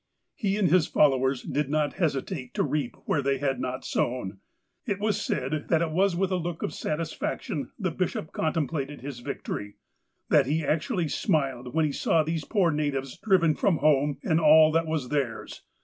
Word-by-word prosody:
He 205 - -1
and 205 -3 +3
his 180 -3 +4
followers 135 -3 +2
did 145 -1 -2
not 150 -1 0
hesitate 140 -3 -2
to - - +2
reap 145 -5 -2
where 145 - +1
they 140 0 +1
had 135 -1 -1
not 130 +1 -4
sown. 105 -6 -2 0.4
It 205 -5 -2
is 210 -1 0
said 145 +2 -2
that 165 0 +3
it 160 - -2
was 185 +2 +2
with 190 +1 0
a 185 - +1
look 170 -1 -4
of - - -2
satisfaction 155 -1 -3
the 185 -5 -1
bishop 165 -2 -3
contemplated 150 -2 -2
his 135 -2 -6
victory. 105 -3 -5 0.5
That - - +4
he 155 +2 0
actually 165 - 0
smiled 135 - -1
when 160 -1 +3
he 150 - 0
saw 160 +3 +2
these 160 0 -3
poor 190 -6 +2
natives 140 -3 -2
driven 185 -6 +3
from 170 +2 +1
home 145 -1 +2
and 160 - +2
all 155 0 +7
that 165 +1 +1
was 155 -6 -2
theirs. 135 -6 -3
155 Hz, 180 wpm, -27 LUFS, 135-165 Hz, 0.5 s, all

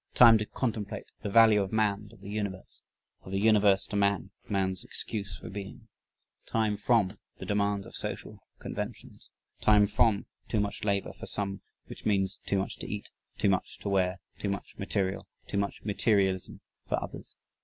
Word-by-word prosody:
Time 115 -2 +9
to 105 - -2
contemplate 110 -5 -3 0.2
the 105 - -3
value 110 -1 +7
of 95 - -3
man 105 -1 +1
to 115 - -16
the 100 0 -12
universe, 100 -3 -4 0.4
of 95 - -10
the 95 - 0
universe 105 -2 +5
to 110 - -6
man, 100 -1 +2 0.2
man's 95 -2 0
excuse 100 -3 -4
for - - -10
being. 100 0 -8 0.6
Time 110 -2 +1
FROM 105 -2 +2 0.2
the - - -7
demands 100 -1 +1
of - - -12
social - - -5 0.2
conventions. - - -6 0.3
Time 105 -1 +6
FROM 105 0 +2 0.2
too 110 - 0
much 105 0 -2
labor 100 -2 0
for - - -9
some, 100 -1 -2 0.2
which - - -10
means 95 -3 +1
too 100 - +2
much 95 - -2
to - - -5
eat, 105 0 -5 0.3
too 105 - +2
much 95 - -1
to 100 - -4
wear, 95 -1 +2 0.2
too 100 - -1
much 100 0 -4
material, 100 -1 -1 0.2
too 100 - -1
much 100 0 -3
materialism 100 -3 +1 0.3
for - - +2
others. - - -8
100 Hz, 175 wpm, -30 LUFS, 95-105 Hz, 0.6 s, Time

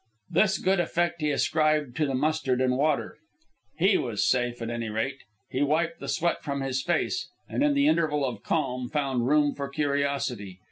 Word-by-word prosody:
This 195 -3 +3
good 190 0 +1
effect 175 -1 0
he 150 - +1
ascribed 155 -2 +1
to 155 -2 +2
the 135 - -1
mustard 130 -2 0
and 130 -1 +2
water. 145 +2 0 0.6
He - - +4
was - - -1
safe, 120 -1 +1
at 115 0 -4
any 115 -1 -3
rate. 110 +6 -2 0.3
He 130 - -1
wiped 165 +4 +1
the 140 - -7
sweat 165 +5 0
from 140 -2 -3
his 135 -1 -1
face, 175 - -1 0.2
and, - - -2
in 290 0 +3
the 280 +1 +4
interval 150 - +2
of 120 -6 -4
calm, 125 +1 -1
found 135 -5 0
room 145 0 +3
for 140 -1 -5
curiosity. 140 -9 -1
140 Hz, 185 wpm, -27 LUFS, 130-155 Hz, 0.6 s, He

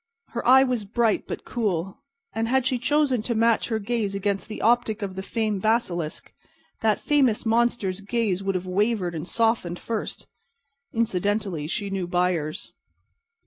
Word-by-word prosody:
Her 235 - -4
eye 265 +1 +8
was 250 -4 0
bright, 225 +2 +1
but - - -6
cool; 195 -4 -2 0.3
and 225 0 -1
had 260 +1 +2
she 255 -1 +1
chosen 275 -2 +2
to 235 +2 -2
match 230 0 +3
her 225 - 0
gaze 215 -2 -2
against 200 0 -1
the 215 - -6
optic 225 -1 +2
of 195 -2 -3
the 190 - -3
famed 215 -1 -1
basilisk, 185 -8 -1 0.5
that 220 -2 +2
fabulous 265 -8 +2
monster's 225 -4 +1
gaze 200 -3 0
would 195 0 -1
have 185 0 -2
wavered 190 -1 0
and 160 +1 -5
softened 225 -7 +1
first. 225 +2 -4 0.7
Incidentally, 200 -6 0
she 200 +4 -3
knew 190 -2 -2
buyers. 175 -4 -1
215 Hz, 155 wpm, -25 LUFS, 190-235 Hz, 0.7 s, eye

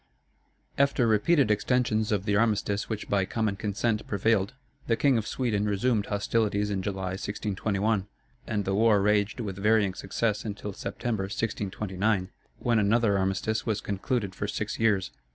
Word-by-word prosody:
After 140 -3 +3
repeated 115 +4 +3
extensions 110 0 +1
of 100 -2 0
the 100 -1 +1
armistice 105 -2 +1
which 110 -2 -4
by 100 -1 +2
common 110 0 -1
consent 105 +2 -1
prevailed, 105 +2 +1 0.3
the 115 - +3
King 135 +2 +3
of 110 - -5
Sweden 110 -5 0
resumed 105 +1 +1
hostilities 105 0 0
in 95 -2 -1
July, 95 -1 -3
1621; 100 +1 -1 0.4
and 105 -3 -1
the 95 - 0
war 105 0 +4
raged 105 +3 +1
with 100 -4 -5
varying 105 -1 +3
success 100 +3 -1
until 105 -1 -5
September, 110 0 -3
1629, 100 -1 -2 0.3
when 120 -3 +1
another 105 0 +3
armistice 95 +4 -1
was 110 -2 0
concluded 100 0 -2
for 100 - -3
six 105 +1 -3
years. 105 -4 +2
105 Hz, 150 wpm, -27 LUFS, 100-110 Hz, 0.4 s, war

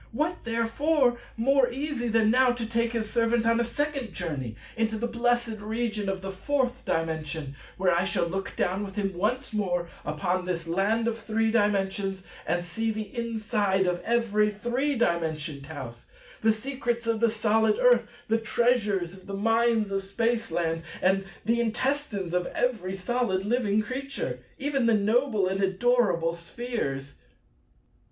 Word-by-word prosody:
What 310 +6 -1
therefore 240 +3 +2 0.2
more 260 +2 +4
easy 270 -1 -2
than 220 -1 +3
now 255 0 +5
to 240 -2 -4
take 230 +1 0
his 225 -2 -1
servant 230 0 +1
on 230 0 +3
a - - +3
second 270 -2 -2
journey 140 - -4 0.2
into 225 -1 0
the 235 - -1
blessed 240 -2 0
region 215 -1 -2
of 190 -1 -3
the 195 - -3
Fourth 255 +5 -1
Dimension, 160 -3 -2 0.2
where 185 -2 +3
I 170 +1 +2
shall 180 -4 +1
look 190 +3 -4
down 190 +3 0
with 195 -1 -7
him 195 -2 -1
once 220 +8 -1
more 175 -5 -1
upon 175 +5 -1
this 170 -2 -2
land 200 +7 +1
of 230 -1 -1
Three 225 0 0
Dimensions, 195 -3 +1 0.2
and 175 +1 0
see 225 +6 -2
the 215 -2 -4
inside 215 -4 0
of 180 -1 0
every 220 -3 +2
three 240 +7 -1
dimensioned 160 - -1
house, 130 -6 -8 0.3
the 220 - +5
secrets 240 0 -2
of 230 -1 +1
the 235 0 +4
solid 220 0 +2
earth, 240 -2 +5 0.2
the 225 +1 +2
treasures 215 -6 +1
of 190 -1 -14
the 200 - -4
mines 225 0 +2
of 195 0 0
Spaceland, 195 -5 0 0.2
and 195 +1 +2 0.2
the 235 +2 +2
intestines 235 -5 -1
of 180 0 +1
every 205 -7 -1
solid 195 -1 0
living 215 -2 +2
creature, 270 +5 -4 0.2
even 275 -4 0
the 230 - +5
noble 215 0 +2
and 190 +1 -1
adorable 190 -4 +2
Spheres. 170 - -4
220 Hz, 155 wpm, -27 LUFS, 190-235 Hz, 0.3 s, now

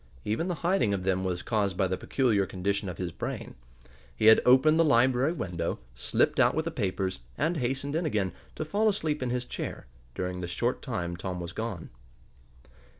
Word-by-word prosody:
Even 110 +12 -1
the 180 - -1
hiding 175 - +3
of 95 - -4
them 95 0 +1
was 90 -2 -2
caused 100 -5 0
by 95 - +3
the 95 0 0
peculiar 105 -4 +1
condition 100 +1 -2
of 90 - -6
his 90 -2 -3
brain. - - -5 0.6
He 110 - -1
had 110 0 +8
opened 155 +6 +6
the - - +7
library 130 0 +4
window, 90 - -3 0.2
slipped - - +1
oot - - +4
with 160 +1 0
the 165 - -2
papers, 95 -6 -2 0.2
and 160 +3 +1
hastened 135 +2 -2
in 165 0 0
again, 100 -9 0 0.2
to 155 - -3
fall 210 +7 +2
asleep 155 -8 -1
in 130 - -1
his 125 0 -1
chair, - - -5 0.3
during 90 0 -3
the 90 - -3
short 85 - -1
time 85 -1 -3
Tom 90 0 -4
was 85 -1 -5
gone. 110 -6 -5
110 Hz, 195 wpm, -28 LUFS, 95-145 Hz, 0.6 s, had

